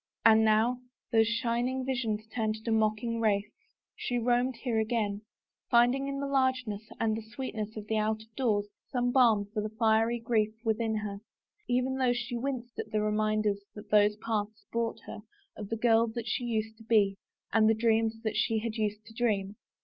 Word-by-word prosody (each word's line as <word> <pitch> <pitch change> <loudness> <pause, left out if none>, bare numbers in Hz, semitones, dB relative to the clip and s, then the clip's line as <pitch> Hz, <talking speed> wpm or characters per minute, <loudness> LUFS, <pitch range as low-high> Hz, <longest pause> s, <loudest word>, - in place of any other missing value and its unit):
And 220 -1 +7
now, 220 +3 +3 0.3
thosw 225 0 +5
shining 240 +2 0
visions 230 -5 -1
turned 220 -2 0
to 230 - 0
mocking 220 +1 +1
wraiths, 210 -1 +1 0.4
she 245 - -2
roamed 245 +2 +1
here 230 -2 -1
again, 215 -2 -1 0.5
finding 245 +3 +4
in 275 0 -3
the 280 - -2
largeness 260 -6 0 0.2
and 220 -1 +1
the 225 - -4
sveetness 220 -1 -5
of 210 - -6
the 220 0 -1
out 215 0 0
of 220 0 -26
doors 215 -6 +1 0.2
some 245 -2 0
bakn 215 -6 +4
for 215 - -1
the 215 - -3
fiery 225 +1 +2
grief 220 -2 0
within 220 0 0
her, 210 -2 -4 0.5
even 255 +2 +1
though 250 -2 +3
she 240 0 -4
winced 245 -1 -4
at - - -4
the 215 -1 0
reminders 215 -1 +1 0.2
that 210 0 -11
those 210 0 +5
paths 215 -1 -3
brought 230 -1 -2
her 225 - -8 0.4
of 205 -2 -7
the 225 - -2
girl 230 0 +4
that 225 0 -5
she 240 +2 -2
used 220 -1 -2
to 225 - -14
be 210 -3 +3 0.4
and 220 -1 +5
the 225 - +4
dreams 225 0 +1
that 220 -1 -2
she 220 +1 +1 0.2
used 215 -1 -2
to 225 - -14
dream. 210 -4 0
225 Hz, 185 wpm, -30 LUFS, 215-240 Hz, 0.5 s, And